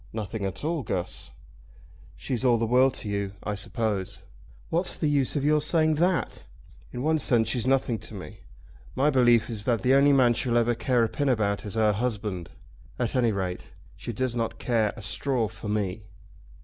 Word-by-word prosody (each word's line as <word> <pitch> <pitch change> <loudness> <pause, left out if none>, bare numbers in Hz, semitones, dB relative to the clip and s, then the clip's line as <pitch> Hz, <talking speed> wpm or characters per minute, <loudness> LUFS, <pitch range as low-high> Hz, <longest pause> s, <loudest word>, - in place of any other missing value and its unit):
"Nothing 110 -1 -4
at 95 +6 -5
all, 160 0 -1
Guss." 95 -6 -4 0.9
"She's 125 -1 -3
all 120 -2 +4
the 115 - 0
world 125 +3 +3
to - - -5
you, 100 -1 -2
I 105 - -2
suppose?" 100 -1 -3 0.5
"What's 175 +3 0
the 155 - 0
use 140 -1 +1
of 145 -1 0
your 150 0 +3
saying 155 0 +2
that? 180 0 0 0.5
In 125 - -5
one 160 +1 +2
sense 115 -5 +2
she's 120 +1 0
nothing 130 -4 +1
to 110 - -7
me. 100 +1 -9 0.6
My 145 +3 +3
belief 120 -4 +4
is 110 -3 -4
that 120 -3 +1
the 130 +1 +4
only 140 +1 +5
man 130 -4 +5
she'll 120 0 0
ever 120 0 +3
care 120 0 +1
a - - +2
pin 145 +4 -1
about 105 -5 0
is 105 - -6
her 110 -1 +3
husband. 105 -6 -3 0.5
At 125 +1 -2
any 120 -3 +3
rate 95 -3 -3 0.3
she - - -6
does 125 +1 -2
not 115 -1 -2
care 115 -4 +1
a 110 - -8
straw 120 +3 0
for 110 0 -9
me." 105 -1 -2
115 Hz, 190 wpm, -26 LUFS, 105-130 Hz, 0.9 s, only